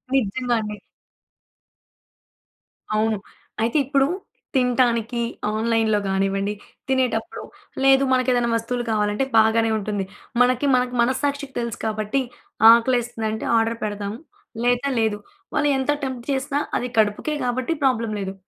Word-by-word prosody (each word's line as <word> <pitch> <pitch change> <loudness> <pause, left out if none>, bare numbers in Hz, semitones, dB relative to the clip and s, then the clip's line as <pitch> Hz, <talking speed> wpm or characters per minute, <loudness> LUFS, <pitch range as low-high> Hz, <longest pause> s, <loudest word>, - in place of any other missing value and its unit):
నిజంగా 245 0 0
అండి. 210 -1 -5 2.2
అవును. 215 0 +1 0.4
అయితే 230 +6 +1
ఇప్పుడు 275 0 +2 0.5
తినటానికి 245 -2 +2 0.3
ఆన్‌లై‌న్‌లో 220 -1 +1
గానివ్వండి, 195 +1 0 0.3
తినేటప్పుడు, 260 0 -1 0.4
లేదు 270 0 +6
మనకేదైనా 250 -2 +2
వస్తువులు 240 +2 -2
కావాలంటే 210 +3 +1
బాగానే 225 +1 +4
ఉంటుంది. 205 -2 -3 0.4
మనకి 250 +2 +3
మనకు 250 0 0
మనస్సాక్షికి 275 +3 -1
తెలుసు 235 -2 -3
కాబట్టి 215 +4 -1 0.5
ఆకలేస్తుందంటే, 230 -2 +1
ఆర్డర్ 225 0 +1
పెడదాం 205 -1 -3 0.5
లేత 245 +1 +2 0.2
లేదు. 220 -2 +1 0.4
వాళ్ళు 295 -1 +2
ఎంత 265 +2 0
టెంప్ట్ 260 -3 -4
చేసినా 275 +1 -1 0.2
అది 250 - -2
కడుపుకే 215 +7 +1
గాబట్టి 250 +5 -1
ప్రాబ్లమ్ 230 -5 +1
లేదు. 190 -1 -4
235 Hz, 110 wpm, -22 LUFS, 215-255 Hz, 2.2 s, లేదు